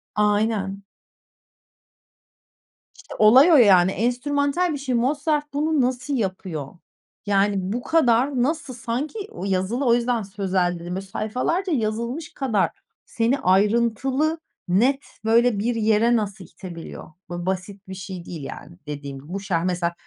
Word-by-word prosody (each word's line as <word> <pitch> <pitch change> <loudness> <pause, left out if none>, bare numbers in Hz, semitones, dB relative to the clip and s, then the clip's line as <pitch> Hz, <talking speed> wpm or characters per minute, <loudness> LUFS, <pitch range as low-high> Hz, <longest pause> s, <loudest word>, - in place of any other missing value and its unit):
Aynen. 205 -2 0 2.1
İşte, - - -12
olay 255 +10 +7
o, 320 - +7
yani. 190 -7 +6
Enstrümantal 285 - 0
bir 285 - -3
şey. 265 -3 -2
Mozart 295 +4 0
bunu 300 0 +1
nasıl 255 +3 -1
yapıyor? 185 - -3 0.6
Yani, 200 0 +2 0.2
bu 245 +1 -3
kadar 255 -4 +2
nasıl 295 -2 -2
Sanki 250 - -4
o 195 - -6
yazılı, 195 +8 -1
o 235 - +5
yüzden 240 -2 0
sözel 190 -3 -1
dedim. 175 +2 -5
Böyle 195 +1 -5
sayfalarca 255 - -2
yazılmış 235 +6 -2
kadar 225 -8 +1 0.4
seni 240 +4 0
ayrıntılı, 235 - +2 0.3
net, 250 +10 +2 0.2
böyle 230 -1 +3
bir 235 +3 0
yere 225 +2 +3
nasıl 200 -4 -3
itebiliyor? 165 -1 -10 0.2
Böyle 175 0 -5
basit 190 +1 -4
bir 190 - -7
şey 185 -2 -7
değil, 160 -5 -7
yani, 170 +5 -9
dediğim. 140 -2 -6
Bu 180 +7 -5
şar 175 -4 -1
mesela, 175 -1 -1
220 Hz, 135 wpm, -23 LUFS, 190-260 Hz, 2.1 s, olay